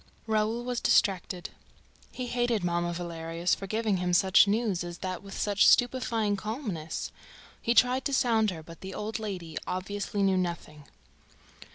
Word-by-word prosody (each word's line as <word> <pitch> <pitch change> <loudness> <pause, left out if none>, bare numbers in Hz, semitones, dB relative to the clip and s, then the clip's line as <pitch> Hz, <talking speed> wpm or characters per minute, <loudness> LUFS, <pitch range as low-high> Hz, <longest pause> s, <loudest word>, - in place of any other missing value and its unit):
Raoul 220 +2 0
was 245 -1 -2
distracted. 185 -3 +1 0.6
He 255 - -5
hated 240 -4 0
Mamma 175 0 0
Valerius 170 0 -2
for 195 - -3
giving 215 -1 0
him 180 0 -1
such 190 +3 +6
news 205 -4 0
as 175 0 -6
that 185 -2 -3
with 200 -1 -9
such 205 -1 +3
stupefying 230 -4 +3
calmness. 200 - -4 0.5
He 235 - +1
tried 250 +2 +4
to 280 - -1
sound 225 -4 +3
her, 165 -4 -6
but 165 +1 -13
the 190 0 -7
old 215 +2 -3
lady 180 -7 -5
obviously 200 +2 -2
knew 190 -1 +3
nothing. 170 -5 -4
200 Hz, 155 wpm, -29 LUFS, 175-225 Hz, 0.6 s, such